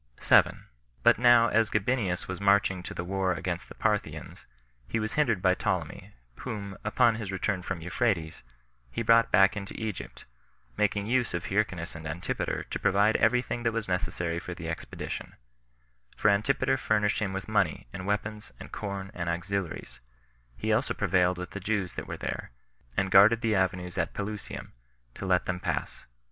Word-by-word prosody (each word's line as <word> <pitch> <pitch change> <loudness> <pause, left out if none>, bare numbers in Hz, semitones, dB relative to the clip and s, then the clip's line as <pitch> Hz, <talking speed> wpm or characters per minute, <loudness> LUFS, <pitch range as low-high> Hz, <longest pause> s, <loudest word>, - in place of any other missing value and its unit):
7. - - +4 0.4
But - - +5
now 120 -2 +6
as 110 0 +3
Gabinius 105 -4 0
was 95 0 -5
marching 100 -2 +3
to - - -7
the - - -3
war 95 0 0
against 85 -1 -4
the - - -11
Parthians, - - -2 0.4
he 115 - -1
was 110 0 -2
hindered 115 -11 +1
by 95 -1 +5
Ptolemy, - - -3 0.2
whom, 100 -3 -5
upon 110 +2 +3
his 105 -4 -5
return 95 0 -1
from 90 -1 -4
Euphrates, 85 -2 -1 0.5
he 70 - -3
brought 115 +1 +5
back 95 +1 +5
into 100 -1 -6
Egypt, 110 -4 -6 0.5
making 105 -1 +1
use 120 -3 +1
of 85 - -3
Hyrcanus 95 -4 -1
and 80 -1 -7
Antipater 80 +3 -3
to - - -2
provide 105 +3 +3
every 125 +2 +3
thing 120 - -4
that 115 -1 0
was 115 -1 -2
necessary 85 -2 -1
for 90 0 -7
this 85 - -8
expedition; 80 0 -5 0.8
for - - +4
Antipater 120 +6 +2
furnished 105 -4 +1
him 105 -3 -1
with 95 -1 -5
money, 100 -8 +1
and 95 +1 -6
weapons, 105 -3 -2
and - - -10
corn, 100 -2 -5
and 85 -1 -3
auxiliaries; 85 -7 -3 0.6
he - - 0
also - - +1
prevailed 90 0 +2
with 90 0 -6
the 100 - -5
Jews 100 -2 -1
that - - -6
were - - -5
there, - - -4 0.5
and 95 -1 +1
guarded 110 +5 +7
the 115 -1 +1
avenues 90 -2 0
at - - -1
Pelusium, 105 +1 -5 0.4
to 95 - -6
let 90 -1 +2
them 90 -1 -2
pass. 65 - -3
100 Hz, 175 wpm, -28 LUFS, 90-110 Hz, 0.8 s, guarded